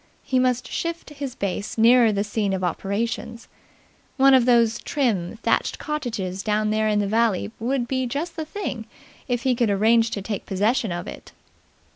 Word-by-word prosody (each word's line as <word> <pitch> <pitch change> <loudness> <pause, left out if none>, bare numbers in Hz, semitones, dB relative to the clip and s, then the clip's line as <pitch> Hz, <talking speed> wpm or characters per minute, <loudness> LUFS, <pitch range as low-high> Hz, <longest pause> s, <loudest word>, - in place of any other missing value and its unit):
He 260 - +1
must 255 -1 +1
shift 335 -2 -4
his 280 -3 -6
base 200 0 -3
nearer 230 0 +6
the 200 -1 0
scene 205 -1 -1
of 190 -1 -2
operations. 225 +6 -3 0.7
One 270 0 +6
of 255 -2 +5
those 235 -2 +3
trim, 230 -9 -1
thatched - - +1
cottages 220 - -4
down 215 0 0
there 215 0 +1
in 210 -1 +2
the 205 - +1
valley 220 -1 +1
would 240 +1 -1
be 260 0 -1
just 300 +7 -4
the 320 - -3
thing, 300 - -5 0.4
if 245 -2 -1
he 260 - +3
could 235 -2 +1
arrange 225 +3 +3
to 200 -3 -4
take 205 -1 -5
possession 210 +2 +1
of 175 0 -4
it. - - -10
230 Hz, 175 wpm, -23 LUFS, 205-255 Hz, 0.7 s, nearer